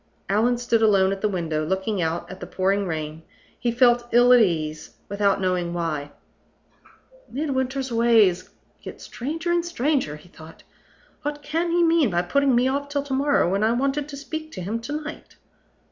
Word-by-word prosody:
Allan 225 +5 +2
stood 235 -2 +1
alone 195 -3 +4
at 195 0 -4
the 210 - +1
window, 165 -5 -2
looking 190 +4 -1
out 165 +1 -2
at 185 - -10
the - - -7
pouring 195 +1 0
rain. 155 -1 -4 0.4
He 240 - 0
felt 240 0 +3
ill 245 +1 +6
at 245 - +7
ease, 155 -6 -1
without 200 0 +1
knowing 180 -2 -1
why. 155 -4 -3 1.2
"Midwinter's 265 -2 -2
ways 220 -6 +3 0.3
get - - -9
stranger 320 +7 -4
and 345 0 +2
stranger," 285 - -1
he 150 - -15
thought. 160 -2 -14 0.6
"What 295 0 -4
can 325 +4 -1
he 345 +1 +2
mean 330 -6 +3
by 175 -1 0
putting 275 +8 +2
me 245 +2 +3
off 285 +2 -2
till 285 -1 -1
to 285 -1 -5
morrow, 285 -2 +2
when 200 +2 +1
I 225 +1 +3
wanted 275 +4 -1
to 280 - -7
speak 315 +2 -6
to 185 - -6
him 210 +6 -3
to 240 +6 -6
night?" 300 +1 -9
230 Hz, 180 wpm, -24 LUFS, 185-280 Hz, 1.2 s, at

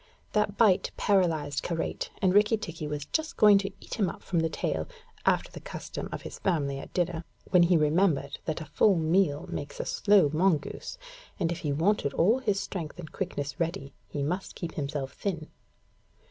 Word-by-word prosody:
That 210 -1 +1
bite 205 -6 +4
paralysed 160 -8 +2
Karait, 165 -2 -3
and 185 -1 +4
Rikki 210 +2 +5
tikki 165 -6 -6
was 150 -1 -4
just 315 - -2
going 210 -2 +7
to 195 0 -2
eat - - -7
him 195 -4 +3
up - - -9
from 175 - 0
the 165 0 +1
tail, - - -2 0.4
after - - +2
the - - -8
custom - - -6
of - - -5
his - - -8
family 140 -7 0
at - - -9
dinner, 175 -2 -1 0.3
when 180 -2 +6
he 175 0 +5
remembered 150 -2 +2
that 160 0 -2
a - - -6
full 190 +7 +3
meal 160 -2 +2
makes 145 0 -6
a - - -2
slow 200 -8 +4
mongoose, 170 - 0 0.4
and 170 - +1
if 170 - -3
he 150 - -2
wanted 160 -1 +1
all 220 +10 +4
his 205 -6 0
strength 185 -6 -5
and 155 -3 -8
quickness 145 -7 -4
ready, 165 -4 -2
he 145 - -3
must 180 +7 -3
keep 170 -2 -5
himself 140 -2 -3
thin. 170 -6 -4
170 Hz, 190 wpm, -28 LUFS, 150-195 Hz, 0.4 s, going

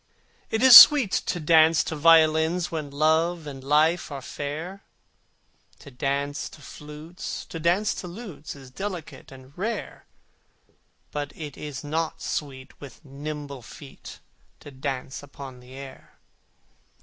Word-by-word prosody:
It 220 +2 -1
is 260 -2 +10
sweet 275 -9 +10
to 175 - -1
dance 160 0 +4
to 160 - -5
violins 160 +2 +3
When 155 -3 -4
Love 160 +3 +1
and 135 -3 -9
Life 155 +4 +2
are 140 - -5
fair: 155 +9 -6 1.0
To 140 - -14
dance 140 +2 -3
to - - -15
flutes, 150 +6 -9
to 165 - -8
dance 175 +6 +1
to 180 - -8
lutes 175 -6 -9
Is 135 -2 -14
delicate 180 -3 -7
and 135 +1 -15
rare: 220 +6 -5 1.0
But 145 -1 -4
it 150 -3 -8
is 145 -3 -7
not 160 +2 -3
sweet 135 -3 -6
with 140 +2 -13
nimble 145 -1 -7
feet 135 +4 -12 0.4
To 145 - -11
dance 130 -1 -5
upon 140 -2 -11
the 125 +1 -15
air! 135 -1 -12
150 Hz, 135 wpm, -25 LUFS, 140-165 Hz, 1.0 s, is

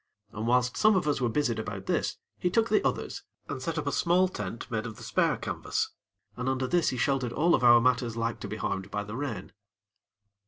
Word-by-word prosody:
And 110 +2 -4
whilst 125 0 +2
some 215 -1 +5
of 180 -5 +1
us 145 -2 +1
were 120 - +2
busied 120 -2 0
about 100 -3 -5
this, - - 0 0.2
he 180 - +1
took 225 +5 +2
the 390 - +3
others - - -2 0.3
and - - -5
set - - -3
up - - -2
a - - 0
small 180 +2 +3
tent 105 - -5
made 110 0 -1
of 110 - -8
the 120 - -12
spare 110 -2 +1
canvas, - - -2 0.4
and 125 +1 -2
under 130 0 0
this 170 +5 +2
he 130 - -3
sheltered 130 -1 0
all 165 +6 +3
of - - +2
our 120 -1 +8
matters 120 -1 +1
like 115 0 -1
to - - -6
be - - -5
harmed 95 0 -3
by 105 0 -2
the 105 +2 -7
rain. 130 -4 -4
125 Hz, 230 wpm, -28 LUFS, 115-145 Hz, 0.4 s, our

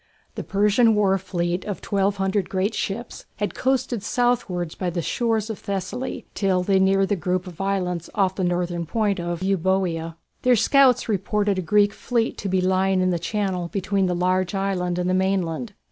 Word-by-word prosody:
The - - -5
Persian 210 +3 +3
war 200 -2 +3
fleet 175 -1 -2
of 205 -5 -5
1200 195 -1 0
great 195 +3 0
ships 225 +4 -4
had 205 0 -2
coasted 260 -3 0
southwards 210 -8 0
by 185 - -3
the 170 -1 -3
shores 225 0 0
of 215 - -7
Thessaly 230 +5 -4
till 190 -3 +1
they 195 +1 +3
neared 195 0 +3
the 205 - +2
group 180 +1 -1
of 180 -1 -8
islands 180 -3 -1
off 195 -3 +2
the 190 - -3
northern 175 -1 -1
point 205 +1 0
of 175 +1 -3
Euboea. 185 -3 0 0.3
Their 250 -1 +4
scouts 255 +3 +4
reported 205 -1 0
a - - 0
Greek 205 +3 +3
fleet 235 -2 -1
to 200 - -3
be 185 0 +1
lying 190 +1 +2
in 185 0 +2
the 170 - 0
channel 185 -1 -2
between 195 +1 0
the 180 - 0
large 185 +1 0
island 185 -2 -1
and 180 0 -1
the 185 - +1
mainland. 190 +2 0
195 Hz, 180 wpm, -23 LUFS, 180-205 Hz, 0.3 s, Their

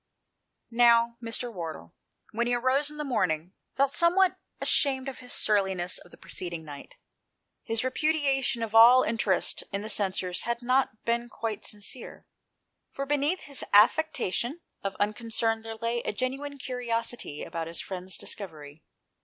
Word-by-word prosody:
Now, 235 0 +4
Mr. 230 +1 -4
Wardle, 160 - -7 0.4
when 235 +2 0
he 245 - +2
arose 260 +4 +2
in 300 - -10
the 300 - -3
morning, 185 - -1 0.2
felt 275 0 +2
somewhat 355 +4 +3 0.2
ashamed 265 -2 +1
of 270 - -6
his 250 -1 -7
surliness 190 -4 +1
of - - -16
the - - -15
preceding 170 -3 -5
night. 145 -2 -10 0.7
His 225 0 -1
repudiation 270 -3 +1
of 225 -1 -4
all 240 +3 +8
interest 215 -4 0
in 200 +1 -2
the 215 - -5
censers 185 -3 0
had 235 +1 -3
not 255 -3 +1
been 235 +1 0
quite 220 -2 -4
sincere, 210 +4 -5 0.7
for 275 - -4
beneath 295 +5 0
his 280 -1 -2
affectation 250 - +3 0.2
of 195 -1 -3
unconcern 225 +1 0
there 225 0 -7
lay 230 +1 -2
a - - -3
genuine 270 +5 -3
curiosity 240 - -3
about 165 -1 -4
his 165 0 -3
friend's 185 -1 -3
discovery. 155 -6 -4
230 Hz, 145 wpm, -28 LUFS, 200-260 Hz, 0.7 s, all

